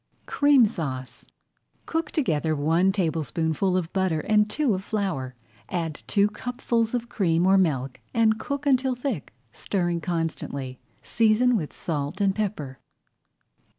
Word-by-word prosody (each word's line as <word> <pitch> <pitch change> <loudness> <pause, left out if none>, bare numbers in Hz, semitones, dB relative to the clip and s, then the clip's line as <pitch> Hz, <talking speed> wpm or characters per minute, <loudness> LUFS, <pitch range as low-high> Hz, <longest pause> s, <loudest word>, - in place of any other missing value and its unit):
CREAM 285 -4 +5
SAUCE 135 - -5 0.6
Cook 325 -1 -2
together 160 - 0
one 165 +6 +2
tablespoonful 165 0 0
of 175 -2 -3
butter 185 -5 +1
and 210 +2 +2
two 265 +1 +1
of 190 0 -3
flour. 185 -13 -2 0.3
Add 165 -4 -3
two 205 -1 +3
cupfuls 230 +1 -1
of 240 -1 -2
cream 175 -6 +1
or 190 +1 +5
milk 135 -9 +1
and 220 -2 +3
cook 280 +4 -4
until 260 -2 +2
thick, 245 - -4 0.2
stirring 175 - -2
constantly 155 -7 -3 0.2
Season 230 +2 +3
with 160 -9 -2
salt 145 -4 -3
and 195 -1 +2
pepper. 185 -11 -3
190 Hz, 130 wpm, -25 LUFS, 160-225 Hz, 0.6 s, CREAM